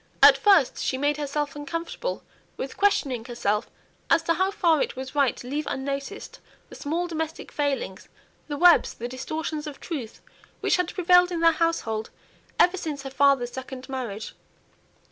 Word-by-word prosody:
At - - +10
first 390 -11 +4
she 260 - -1
made 290 +2 +1
herself 290 0 -2
uncomfortable 330 - -4 0.3
with 265 - -5
questioning 280 - +1
herself 220 -3 -1 0.4
as 330 0 +4
to 335 - +2
how 375 +3 +1
far 340 -6 +2
it - - -2
was 260 0 -6
right 280 -3 +2
to 245 - -9
leave 290 +3 -3
unnoticed 275 +1 -4 0.3
the - - -11
small 330 +5 -2
domestic 320 -2 -5
failings 275 -10 -2 0.4
the 290 -1 -4
webs, 350 +2 +5
the 240 - -5
distortions 305 +4 -4
of 290 - -8
truth 270 -10 -6 0.4
which - - +2
had 360 -1 -1
prevailed 360 0 +5
in 335 -2 -2
their 330 0 +6
household 310 -10 -1 0.5
ever 360 +2 +5
since 300 -5 -4
her 270 - -6
father's 270 -3 +3
second 260 0 -8
marriage. 235 -6 -5
290 Hz, 165 wpm, -25 LUFS, 260-330 Hz, 0.5 s, At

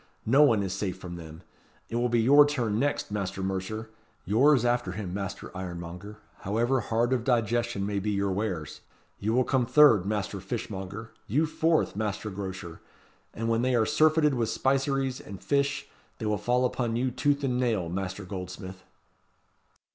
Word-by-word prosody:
No 135 +6 +5
one 115 -9 +5
is 95 -2 -3
safe 95 -1 -3
from 90 -1 -8
them. 80 0 -10 0.4
It 115 - -3
will 120 +1 +1
be 120 -1 +2
your 145 +5 +8
turn 120 -7 0
next, 145 -4 -1
Master 95 -2 -3
Mercer. 95 +4 -3 0.3
Yours 125 +5 +4
after 120 -6 0
him, 95 -3 -5
Master 100 0 -5
Ironmonger, 90 +2 -7 0.2
however 120 +7 +1
hard 120 +2 0
of 125 -3 0
digestion 120 -3 0
may 100 0 -1
be 105 +2 -2
your 100 -1 0
wares. 95 -6 -3 0.4
You 105 +2 -1
will 130 +2 +4
come 125 -2 +1
third, 125 -8 +6
Master 105 -1 -2
Fishmonger. 105 0 -6 0.2
You 145 +9 +2
fourth, 160 -3 +1
Master 105 0 -3
Grocer. 95 -3 -6 0.5
And 115 +1 -4
when 115 0 +2
they 130 0 +2
are 115 -2 +3
surfeited 155 +2 +3
with 115 -3 0
spiceries 135 +1 0
and 100 -2 -9
fish, 140 +1 0 0.3
they 110 - -5
will 105 -1 0
fall 125 +4 +1
upon 120 -2 -1
you, 125 +2 0
tooth 145 +3 0
and 125 -2 0
nail, 110 -8 0
Master 95 +2 -4
Goldsmith." 95 0 -7
110 Hz, 170 wpm, -28 LUFS, 95-125 Hz, 0.5 s, your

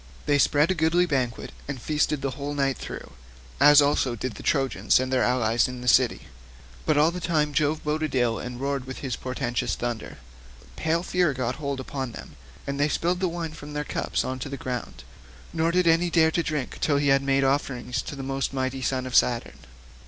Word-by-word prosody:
They 145 -1 +3
spread 150 +5 +3
a - - +3
goodly 165 +1 +2
banquet 130 -7 -2 0.2
and 140 -3 -4
feasted 150 +1 0
the 135 - -1
whole 145 +2 -5
night 135 -2 0
through, - - -7 0.5
as 145 +1 +8
also 135 -3 +1
did 125 +1 -4
the - - -10
Trojans 135 -3 +2
and 130 0 -2
their 130 - +3
allies 120 -2 +2
in 125 -1 -7
the 125 - -7
city. 115 - +4 0.7
But - - +3
all 155 +3 +5
the 180 - -5
time 155 -4 0
Jove 150 +2 +1
boded 155 +1 -1
them 130 - +1
ill 115 -2 +1
and 125 0 -6
roared 140 -1 -2
with 130 0 -7
his 125 -3 -2
portentous 125 -1 -2
thunder. 120 -2 -4 0.6
Pale 165 - 0
fear 180 -5 +1
got 125 -1 -2
hold 140 -3 -3
upon 130 -2 -5
them, - - -10 0.3
and 140 0 -3
they 145 +1 +3
spilled 175 +4 0
the 185 - +1
wine 165 -2 -4
from 150 -1 -9
their 150 0 -2
cups - - -2
on 130 0 -3
to 135 - -5
the 140 - -5
ground, 125 -2 -5 0.5
nor 165 0 +1
did 180 +1 +2
any 165 +1 +4
dare 160 -1 +4
drink 155 -5 -2
till 145 -3 +2
he 140 0 +2
had 135 0 +4
made 135 0 +2
offerings 135 -2 0
to - - -7
the 135 - -6
most 135 0 -2
mighty 130 0 -2
son 130 0 -1
of 130 - -6
Saturn. 120 -1 +2
140 Hz, 210 wpm, -25 LUFS, 130-155 Hz, 0.7 s, as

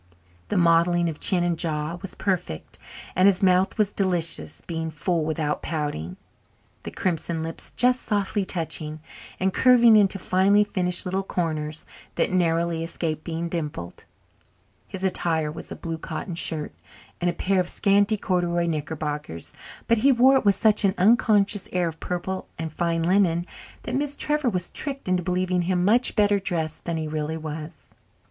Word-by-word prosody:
The 205 - -1
modelling 170 0 +3
of 155 - -7
chin 180 -3 +2
and 170 -2 -1
jaw 155 +1 -1
was 195 - -8
perfect 180 - -3 0.4
and 185 +2 +5
his 195 -1 +3
mouth 185 +2 +3
was 210 -2 +2
delicious, 165 - 0
being 160 -1 -3
full 160 +2 -1
without 155 -1 -2
pouting, 145 - -4 0.6
the - - -6
crimson 165 -2 -2
lips 165 0 -7
just 250 0 +3
softly 205 -1 -1
touching, 155 -3 -3 0.4
and 190 0 +1
curving 240 -3 +6
into 200 -2 +4
finely 195 +2 +3
finished 180 -2 0
little 190 +1 -1
corners 155 -5 -3 0.3
that - - +1
narrowly 170 -2 +1
escaped 165 -2 -3
being 170 0 -3
dimpled. 150 - -5 0.8
His 190 -1 -7
attire 165 -5 +1
was 160 - -10
a - - -4
blue 165 -1 -5
cotton 180 - -5
shirt 160 -2 -1 0.5
and 175 - +2
a - - -1
pair 195 0 0
of 180 -1 +1
scanty 205 +2 +2
corduroy 175 -3 0
knickerbockers, 150 - -4 0.3
but 230 -1 +3
he 275 +5 +5
wore 260 +2 +5
it 265 - +2
with 200 -1 +5
such 215 +1 +3
an 195 -1 +2
unconscious 205 -1 +3
air 180 -1 +1
of 165 -1 -6
purple 185 +1 -4
and 160 -1 -5
fine 170 -1 0
linen 175 -1 +2 0.4
that 245 - -5
Miss 285 +2 -2
Trevor 300 -3 0
was 180 -5 -3
tricked 275 -5 -4
into 185 -1 +1
believing 180 0 0
him 180 0 0
much 235 +5 +3
better 205 -2 +3
dressed 160 -5 -3
than 170 -1 -2
he 160 -1 -3
really 155 +1 -3
was. 155 0 -8
175 Hz, 165 wpm, -24 LUFS, 160-195 Hz, 0.8 s, curving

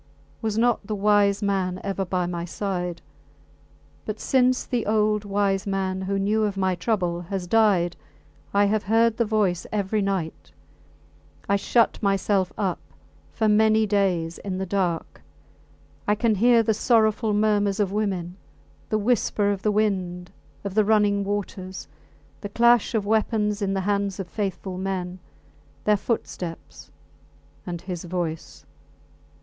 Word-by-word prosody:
Was 220 -2 -2
not 235 -3 +1
the 215 - -2
wise 205 0 +3
man 190 -2 0
ever 195 -1 -2
by 180 -1 -1
my 175 -1 -3
side? 180 -1 -4 1.0
But 215 0 -5
since 255 -1 +2
the 240 -5 -2
old 210 -1 +2
wise 200 -1 0
man, 190 -1 -1
who 195 +1 -1
knew 210 +3 +1
of 200 -2 -3
my 190 -1 +1
trouble, 180 -3 -1
has 195 -3 -3
died, 185 -4 +3 0.6
I 200 0 +4
have 210 +1 0
heard 225 +2 +3
the 235 - +2
voice 205 -5 0
every 210 0 0
night. 190 -5 -3 0.9
I 200 - +3
shut 230 +3 +2
myself 195 -2 +1
up 195 -4 -1 0.5
for 220 - 0
many 220 +1 +4
days 185 -5 0
in 190 -2 -4
the 190 - -2
dark. 180 -3 -2 0.9
I 210 - +3
can 225 +1 +2
hear 230 +3 +4
the 220 - +2
sorrowful 220 -1 +2
murmurs 205 -1 +2
of 200 -2 +1
women, 190 -4 -2 0.5
the 215 - +1
whisper 210 -2 +1
of 195 -1 -3
the 210 - +1
wind, 185 -4 -1 0.3
of 200 -2 -4
the 215 +1 +4
running 205 -1 +3
waters; 195 -2 -4 0.5
the 205 - -6
clash 235 +2 +3
of 210 -2 0
weapons 210 -1 +1
in 195 -1 0
the 195 - 0
hands 200 0 -1
of 190 - -4
faithful 190 -1 -4
men, 185 -1 -3 0.6
their 210 - +4
footsteps 190 -5 -5 0.8
and 175 -2 -4
his 180 -2 -5
voice! 170 -2 -4
200 Hz, 145 wpm, -24 LUFS, 185-215 Hz, 1.0 s, I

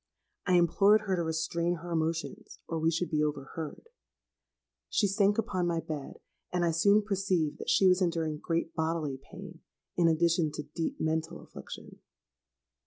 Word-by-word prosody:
I 185 - +4
implored 200 +5 +5
her 195 -3 -1
to 175 - -1
restrain 165 +2 -1
her 170 +1 -8
emotions, 165 0 -3
or 165 - -2
we 160 +1 +2
should 170 +2 -1
be 155 -1 +1
overheard. 150 - -5 1.0
She 210 - +2
sank 200 +1 +2
upon 205 -6 0
my 170 -1 0
bed; 150 -4 -6 0.3
and 180 -1 +1
I 170 - +2
soon 200 +6 +4
perceived 185 -7 0
that - - -5
she 195 - +4
was 185 0 +5
enduring 165 -4 0
great 165 0 -2
bodily 160 -4 -2
pain - - -10 0.4
in 170 -1 +3
addition 165 -1 +2
to 150 - -4
deep 155 +3 -4
mental 160 +1 -1
affliction. - - -10
165 Hz, 160 wpm, -30 LUFS, 160-180 Hz, 1.0 s, implored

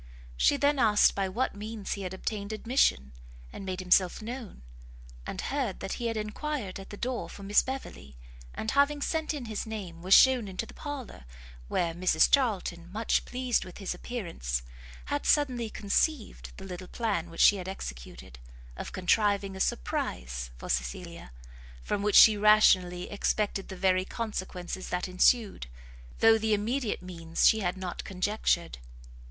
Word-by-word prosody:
She 285 - +3
then 285 0 +2
asked 210 -4 +5
by 195 -1 -1
what 235 +8 -1
means 210 0 -5
he 200 - -6
had 185 -2 -4
obtained 200 +2 -4
admission, 215 - +1 0.4
and - - -8
made 185 -1 -4
himself 180 0 +3
known; 230 - -8 0.6
and - - -5
heard 265 -9 -2
that 195 - -5
he 235 - 0
had 225 -1 -2
enquired 215 -1 -4
at 195 - -10
the 205 - -8
door 245 +2 -3
for 200 - -10
Miss 205 +1 +4
Beverley, 165 - -7 0.4
and, 220 - -2
having 285 +1 +3
sent 320 -1 -1
in 290 -5 -5
his 220 -1 -4
name, 190 -7 -7
was 185 +2 +6
shewn 255 -5 +6
into 190 +3 -4
the - - -13
parlour, 280 - -7 0.4
where 170 - 0
Mrs 180 +2 +3
Charlton, 185 -9 +1
much 220 +3 0
pleased 250 -1 0
with 180 - -11
his 195 -3 -3
appearance, 170 - -4 0.4
had 290 0 -2
suddenly 250 -6 +2
conceived 215 +6 -1
the 195 - -9
little 185 -1 -7
plan 175 -8 -2
which 165 - -11
she 205 - +7
had 185 -1 -6
executed, - - -8 0.4
of - - -7
contriving 200 +1 +1
a - - -7
surprise - - -2
for - - -9
Cecilia, - - -4 0.5
from 200 - -2
which 210 0 +1
she 220 - +9
rationally 185 -4 +4
expected 205 -1 -1
the 190 - -8
very 185 0 +2
consequences 190 -5 -5
that 180 +1 -2
ensued, 190 - +2 0.5
though 225 0 +6
the 220 -1 +2
immediate 225 +1 -2
means 165 -2 -2
she 220 - +5
had 180 -2 -1
not 185 -1 -5
conjectured. 185 - -1
200 Hz, 160 wpm, -29 LUFS, 180-230 Hz, 0.6 s, she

